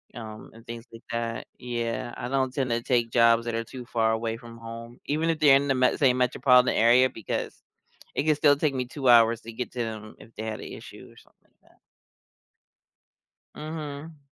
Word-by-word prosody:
um, 110 -2 -9
and 115 +1 -15
things 115 0 -8
like 115 - -13
that. 115 -1 -3
Yeah, 120 0 -4
I 120 - -4
don't 130 -1 0
tend 130 -4 -1
to 115 0 0
take 120 -2 0
jobs 115 0 +4
that 120 - -3
are 115 0 -1
too 125 +1 -10
far 115 -2 +1
away 115 0 -2
from 115 -1 -12
home, 115 +1 -10
even 155 +3 0
if 165 - +1
they're 145 -3 +7
in 140 +1 +2
the 135 - +2
m - - -4
same 130 -4 +3
metropolitan 125 0 +4
area 120 +3 +5
because 110 -5 -5 0.5
it 140 - 0
could 155 -2 +3
still 145 -2 +5
take 145 -1 0
me 125 -1 -1
2 130 0 -2
hours 115 -1 +6
to 115 - -9
get 125 +1 -5
to 125 - -8
them 110 -2 -5
if 115 - -16
they 110 - -6
had 110 -1 -4
an - - -8
issue - - -11
or - - -21
something - - -23
like - - -25
that. - - -31 1.8
Mhm. 155 -1 -7
120 Hz, 210 wpm, -26 LUFS, 115-135 Hz, 1.8 s, they're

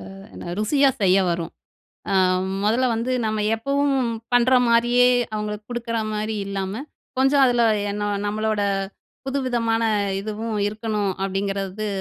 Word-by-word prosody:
அ - - -12 0.2
என்ன, 175 - -7
ருசியா 275 +6 +3
செய்ய 190 0 +4
வரும். 170 0 -2 0.6
அ - - 0 0.5
மொதல்ல 235 +5 +2
வந்து, 235 +3 -2
நம்ம 215 0 -1 0.2
எப்பவும் 275 +4 0 0.4
பண்ற 245 +2 +4 0.2
மாரியே, 240 +1 +4 0.3
அவங்களுக்கு 210 0 -4
குடுக்குற 235 -1 -3 0.2
மாரி 215 +1 -2
இல்லாம, 200 +4 -4 0.4
கொஞ்சம் 270 +1 +4
அதில 240 -1 +2 0.3
என்ன, 205 0 -4 0.2
நம்மளோட 215 0 -1 0.6
புதுவிதமான 240 -4 0 0.4
இதுவும் 215 +2 -4
இருக்கணும். 210 -2 -2
அப்டிங்கிறது, 195 +1 -2
220 Hz, 120 wpm, -23 LUFS, 205-245 Hz, 0.6 s, செய்ய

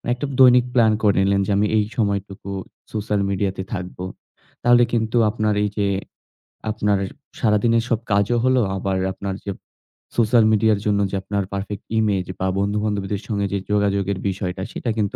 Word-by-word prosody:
মানে 120 - -4
একটা 130 +4 -4
দৈনিক 125 -2 +7
প্ল্যান 115 -3 +5
করে 105 -2 +3
নিলেন 100 0 +2
যে, - - -2
আমি 105 +1 +3
এই 105 - +3
সময়টুকু 100 -3 -2 0.4
সোশ্যাল 105 -1 -1
মিডিয়াতে 95 -1 -1
থাকবো। 90 -1 -5 0.6
তাহলে 120 0 +6
কিন্তু 110 0 0
আপনার 110 -1 0
এই 105 - +1
যে, 100 -2 +1 0.8
আপনার 105 -2 +1 0.4
সারাদিনের 115 +1 +3
সব 115 -3 +1
কাজও 100 +4 +2
হলো 130 -1 +4 0.2
আবার 95 0 -1 0.2
আপনার 95 0 -4
যে 100 - -3 0.7
সোশ্যাল 115 0 +4
মিডিয়ার 110 -1 +3
জন্য 100 -1 +2
যে - - -2
আপনার 100 0 -2
পারফেক্ট 100 +1 -5
ইমেজ 100 -4 +1
বা 95 - 0
বন্ধু-বান্ধবীদের 100 0 -1
সঙ্গে 100 -3 -1
যে - - +1
যোগাযোগের 100 -1 +1
বিষয়টা 95 -1 -4
সেটা 120 - -4
কিন্তু 105 -2 -1
105 Hz, 160 wpm, -22 LUFS, 100-110 Hz, 0.8 s, দৈনিক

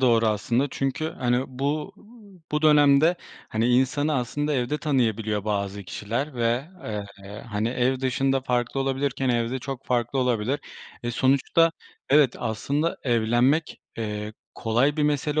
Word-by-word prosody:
doğru 115 -3 +4
aslında. 115 +5 +1
Çünkü, 135 +4 -2
hani, 125 0 +1
bu 145 +7 -3 0.6
bu 150 +1 0
dönemde, 150 +2 +5 0.3
hani, 115 +2 0
insanı 135 +4 +2
aslında 145 +4 -1
evde 130 +3 0
tanıyabiliyor 110 -7 0
bazı 100 -1 -2
kişiler 120 - -4
ve, 120 +5 0 0.5
eee, 100 +1 -9
hani, 105 +2 0
ev 130 +1 0
dışında 135 +1 +1
farklı 125 +1 -1
olabilirken, 135 0 -1
evde 120 +2 0
çok 135 0 -7
farklı 120 +2 0
olabilir. 125 +2 0 0.4
E, 120 - -2
sonuçta 140 +7 +3 0.4
evet, 140 -3 +5
aslında 140 +8 -1
evlenmek, 120 +6 +1 0.2
eee, 105 -1 -4 0.2
kolay 125 +7 +1
bir 150 - +1
mesele 150 +1 +1
130 Hz, 130 wpm, -25 LUFS, 115-140 Hz, 0.6 s, dönemde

